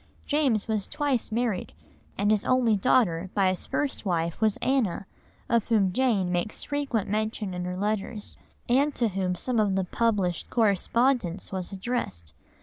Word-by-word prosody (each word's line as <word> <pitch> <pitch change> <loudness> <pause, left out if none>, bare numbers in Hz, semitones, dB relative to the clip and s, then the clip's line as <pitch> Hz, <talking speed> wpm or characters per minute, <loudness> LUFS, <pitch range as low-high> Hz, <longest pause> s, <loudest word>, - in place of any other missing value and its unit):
James 270 -9 +1
was 215 -3 -1
twice 280 -7 -1
married, 225 -4 -1 0.4
and 205 +1 +2
his 215 -2 +2
only 250 -4 +3
daughter 190 -5 +2
by 195 -2 +4
his 185 - -3
first 290 -2 -1
wife 170 -3 -1
was 215 -2 +2
Anna, 245 -8 0 0.4
of 230 -2 +1
whom 200 -5 +2
Jane 210 -7 +1
makes 175 +4 -2
frequent 280 -7 -1
mention 215 -1 -2
in 180 0 -4
her 180 0 -4
letters, 210 +1 -3 0.3
and 275 +4 +2
to 235 -2 +1
whom 185 -2 -1
some 240 +5 -1
of 205 -3 +2
the 190 - +1
published 190 -5 0
correspondence 225 -2 +1
was 190 -1 -3
addressed. 190 - -4
210 Hz, 155 wpm, -27 LUFS, 185-240 Hz, 0.4 s, by